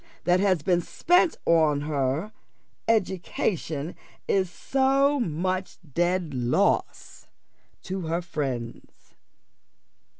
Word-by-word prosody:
that 180 +1 +3
has 185 -6 +2
been 175 -2 +2
spent 350 - +2
upon 155 -3 +3
her 145 +5 -1 0.6
education 180 -6 -1 0.3
is 190 -2 +1
so 275 +7 +2
much 185 -1 -2 0.2
dead 175 -1 0
loss 125 -1 0 0.6
to 185 -3 -4
her 165 +2 0
friends. 135 -9 -5
175 Hz, 90 wpm, -26 LUFS, 150-195 Hz, 0.6 s, that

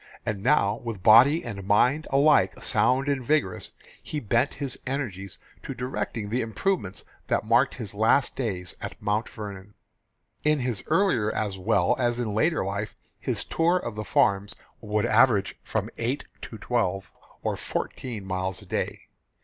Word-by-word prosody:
And 105 -2 -2
now 100 +2 +3
with 115 -6 -6
body 130 +9 +7
and 100 -5 -6
mind 125 +10 +2
alike 145 +2 +4
sound 130 +2 +2
and 140 -3 0
vigorous, 130 -9 0 0.3
he 150 - -4
bent 120 +3 +1
his 140 -3 -1
energies 110 -9 -4 0.2
to - - -6
directing 115 -3 -3
the 120 +5 -1
improvements 115 - -2 0.2
that - - 0
marked 120 +5 +3
his 110 -6 -6
last 110 +6 +2
days 95 -8 -3
at - - -7
Mount 105 +3 -1
Vernon. 100 -2 -9 0.7
In 150 -2 +2
his 125 -5 -2
earlier 155 - +2
as 100 -3 -3
well 90 -1 +2
as 120 -1 +1
in 115 -3 -1
later 150 - +1
life, 100 +2 -4 0.2
his - - -2
tour 170 +2 +2
of 120 -10 -4
the 105 0 -5
farms 100 0 +1 0.2
would 105 -1 -1
average 110 -3 +3
from - - -2
eight 125 +5 -1 0.2
to 110 - -8
twelve 100 -5 -1 0.3
or - - 0
fourteen 115 -7 -5
miles 95 0 -2
a - - -15
day. - - -3
115 Hz, 155 wpm, -26 LUFS, 100-130 Hz, 0.7 s, body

